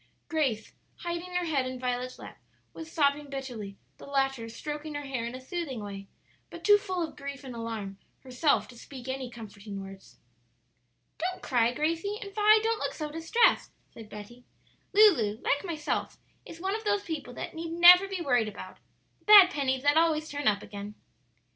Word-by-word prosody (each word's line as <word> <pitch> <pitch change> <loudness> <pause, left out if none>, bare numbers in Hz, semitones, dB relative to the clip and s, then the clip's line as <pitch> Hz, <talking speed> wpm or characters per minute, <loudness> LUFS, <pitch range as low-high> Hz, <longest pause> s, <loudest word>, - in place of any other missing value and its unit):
Grace, 270 -9 -1 0.3
hiding 345 +1 -5
her 360 -1 0
head 280 -6 0
in 255 0 -5
Violet's 250 0 -3
lap, - - -11 0.3
was 325 0 -9
sobbing 290 -1 +1
bitterly, 245 -8 -6 0.2
the - - -12
latter 270 -4 -1
stroking 295 +6 -6
her 290 - -4
hair 255 -4 -3
in 240 - -6
a - - -7
soothing 275 -2 -5
way, 195 -1 -8 0.4
but - - -11
too 415 0 +6
full 370 -4 -2
of - - -15
grief 280 0 -7
and 260 -2 -8
alarm 220 -4 -5 0.2
herself 265 +3 +1
to 250 - -14
speak 255 +1 -11
any 260 -1 -4
comforting 205 -3 -9
words. 195 0 -11 1.0
"Don't 365 +3 -3
cry, 240 -3 +2
Gracie; 330 +9 -1
and, 400 -1 -8
Vi, 430 +1 +5
don't 450 -1 0
look - - -3
so 305 -2 -5
distressed," 330 +9 +2 0.2
said 220 -2 -11
Betty. 215 +4 -11 0.5
"Lulu, 315 - +5
like 285 - +1
myself, 320 -5 -3 0.3
is 330 - -10
one 380 +3 -2
of 445 - -5
those 410 -1 +1
people 290 -7 -6
that - - -6
need 330 0 -5
never 355 +3 +8
be 385 -2 -4
worried 245 -8 +2
about 210 - -10 0.4
the - - -33
bad 405 -3 +9
pennies 265 -4 -1
that 290 +2 +4
always 315 -1 +2
turn 290 0 -3
up 205 -1 +2
again." 205 0 -8
280 Hz, 180 wpm, -28 LUFS, 240-340 Hz, 1.0 s, bad